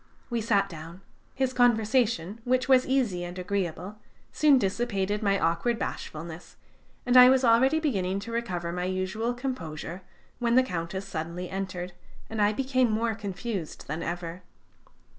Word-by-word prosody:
We 235 -1 0
sat 205 -3 +2
down. 165 +1 -10 0.3
His 265 -1 0
conversation, 230 -5 +2
which 255 +1 +1
was 260 -1 +5
easy 240 -10 +1
and 175 +1 -7
agreeable, 185 +2 -3 0.3
soon 295 -3 +5
dissipated 205 -2 -1
my 200 -2 +2
awkward 170 +9 +1
bashfulness; 160 -4 -6 0.5
and 250 0 +2
I 250 0 +10
was 260 0 +4
already 255 +6 +4
beginning 195 - 0
to 230 - -7
recover 180 -8 -2
my 180 +1 -2
usual 190 +6 -2
composure, 180 - -5 0.4
when 235 -1 +2
the 260 - +6
Countess 180 -3 -4
suddenly 170 0 -5
entered, 185 -2 -4 0.4
and 220 -1 -1
I 205 0 +4
became 255 +1 +1
more 225 +1 0
confused 200 -3 -5
than 155 +3 -3
ever. 170 0 -4
205 Hz, 145 wpm, -27 LUFS, 180-245 Hz, 0.5 s, I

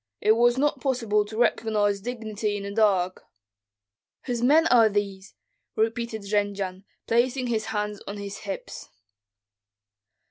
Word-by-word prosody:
It 215 - +3
was 240 +2 +4
not 290 +2 +1
possible 230 -6 +1
to 215 +1 -8
recognize 210 -4 +1
dignity 215 -3 -3
in 200 - -6
the 200 - -5
dark." 195 -4 +1 1.0
"Whose 245 -2 -3
men 300 +6 +5
are 230 -3 +6
these?" 200 -2 -3 0.4
repeated 225 -1 -1
Jendzian, 200 -2 -2 0.2
placing 250 +3 +1
his 225 -3 -1
hands 210 -1 -3
on 200 - -5
his 200 0 -6
hips. 200 -2 -7
215 Hz, 130 wpm, -25 LUFS, 205-235 Hz, 1.0 s, are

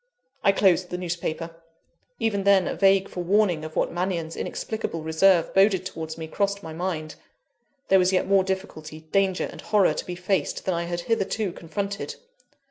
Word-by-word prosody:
I 195 - +6
closed 185 -2 +3
the 180 - -3
newspaper. 170 -1 -4 0.6
Even 205 -3 0
then, 195 -2 +4
a - - -1
vague 195 0 +4
forewarning 180 -2 +1
of 155 0 -8
what - - +1
Mannion's 175 -2 -2
inexplicable 190 -7 -4
reserve 165 +2 +3
boded 195 -1 +4
towards 160 -3 -6
me, 160 - -5
crossed 200 +4 -1
my 160 - -7
mind. 160 -2 -3 0.8
There 190 - +6
was 180 0 +3
yet 185 - +2
more 195 0 +4
difficulty, 170 -5 -5
danger, 195 -2 +2
and - - -10
horror 205 -7 +3
to - - -5
be 180 - -4
faced, 185 +2 -1
than 185 - +1
I 170 0 -2
had 175 0 -3
hitherto 210 0 -1
confronted. 200 +5 -5
185 Hz, 170 wpm, -25 LUFS, 165-195 Hz, 0.8 s, I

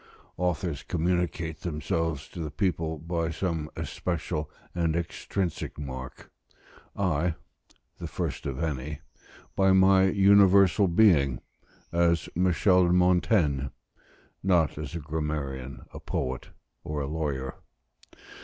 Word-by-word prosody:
Authors 90 -4 -1
communicate 85 -1 -1
themselves 80 -1 -2
to - - -9
the 80 -2 -3
people 80 0 -1
by 85 +1 -2
some 80 -2 -2
especial 80 -3 -3 0.2
and 85 -2 0
extrinsic 85 +1 -3
mark; 65 -3 -7 0.6
I, 85 -3 0 0.6
the - - -4
first - - -4
of 70 +3 -3
any, 75 -1 -3 0.5
by 95 -1 +4
my 95 0 +6
universal 100 0 +5
being; 85 - +4 0.5
as 85 -1 +2
Michel 90 +1 +3
de 85 - +2
Montaigne, 90 -5 +3 0.8
not 90 -5 +2
as 75 +1 -6
a - - -2
grammarian, 75 -4 -4
a - - -7
poet, 65 +1 -3 0.3
or 75 -1 -3
a 70 - -2
lawyer. 70 -4 -3
85 Hz, 110 wpm, -27 LUFS, 75-90 Hz, 0.8 s, my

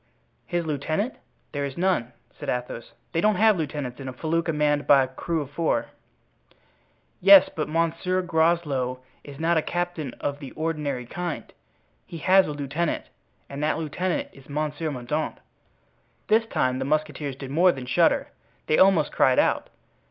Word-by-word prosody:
"His 175 -2 -1
lieutenant? 155 - -1 0.4
There 145 -1 -3
is 140 -1 -5
none," 175 -10 0 0.2
said - - -7
Athos. 125 -2 -4 0.2
"They 165 - 0
don't 210 +1 +3
have 215 +2 +5
lieutenants 145 -6 -4
in 135 - -7
a 130 - -5
felucca 165 +4 -1
manned 150 -1 +1
by 140 -2 +7
a - - -2
crew 160 +5 -3
of 140 -1 -7
four." 165 +2 0 1.3
"Yes, 195 0 +8
but 155 - -2
Monsieur 170 +3 0
Groslow 160 -7 +1 0.2
is 140 -1 -11
not 165 +1 +2
a - - +3
captain 175 -5 -3
of 140 0 -4
the 140 -3 -9
ordinary 150 -5 -2
kind; 175 +6 -5 0.5
he 170 - -9
has 190 +4 +4
a - - -3
lieutenant, 145 +3 -2 0.4
and 140 +1 -6
that 150 0 +1
lieutenant 165 +3 -2
is 135 0 -17
Monsieur 150 +2 -2
Mordaunt." 145 +3 -3 0.9
This 225 +1 +4
time 130 - 0
the 135 - -2
musketeers 150 -1 -1
did 135 0 -8
more 175 +5 +5
than 130 -6 -7
shudder—they 155 +4 0
almost 190 -5 +5
cried 130 -1 +3
out. - - +2
155 Hz, 160 wpm, -25 LUFS, 140-170 Hz, 1.3 s, Yes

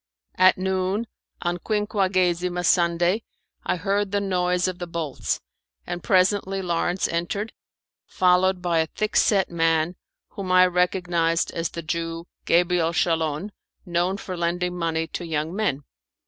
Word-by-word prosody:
At 185 0 +6
noon, 190 +3 -1 0.4
on 175 0 -1
Quinquagesima 185 -4 0
Sunday, 175 +4 +3 0.4
I - - 0
heard 200 +2 -1
the 205 - +1
noise 180 -2 +1
of 185 0 -4
the 175 - -4
bolts, 165 -5 -3 0.5
and 175 0 -4
presently 195 +1 +2
Lawrence 175 0 0
entered, 175 +6 -3 0.5
followed 185 0 +2
by 170 -2 +2
a 160 - +1
thick 215 +5 -3
set 195 -4 +3
man 165 0 +1 0.3
whom 195 -3 -5
I 185 0 +7
recognized 175 -2 +1
as 165 0 -2
the 170 - -7
Jew, 165 +1 -3 0.2
Gabriel 170 -1 +2
Schalon, 165 +2 0 0.3
known 175 +2 0
for 185 -2 -6
lending 175 +1 -1
money 165 -2 -1
to 175 - -6
young 160 +1 -2
men. 150 -10 -1
180 Hz, 135 wpm, -24 LUFS, 170-190 Hz, 0.5 s, I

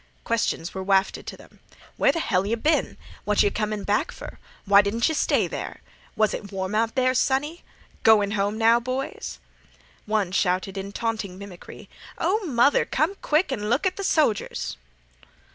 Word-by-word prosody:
Questions 225 -7 -1
were 190 - -4
wafted 195 0 +1
to - - -6
them. - - -18 0.4
"Where - - +3
th' - - -10
hell 195 - +1
yeh 210 +4 0
been?" 300 +7 0 0.3
"What 210 0 +3
yeh 205 - +2
comin' 215 -1 -2
back 205 +1 0
fer?" - - -10 0.3
"Why 200 0 +7
didn't 215 +4 0
yeh 315 - 0
stay - - +2
there?" - - -6 0.3
"Was 215 -1 +2
it 200 -1 -6
warm 190 0 -3
out 225 +1 0
there, 255 -1 +2
sonny?" 280 +6 0 0.4
"Goin' 210 -2 +5
home 205 +1 -1
now, 230 +1 +5
boys?" 255 +4 -4 0.7
One 210 -4 0
shouted 185 0 0
in 195 0 -5
taunting 215 -4 -3
mimicry: 195 -3 -11 0.3
"Oh, 400 +6 0
mother, 265 0 +3
come 310 +7 0
quick 305 +1 +1
an' 210 -5 -3
look 255 +9 +1
at 370 -1 +1
th' 395 - -5
sojers!" 300 - 0
220 Hz, 170 wpm, -24 LUFS, 200-260 Hz, 0.7 s, Why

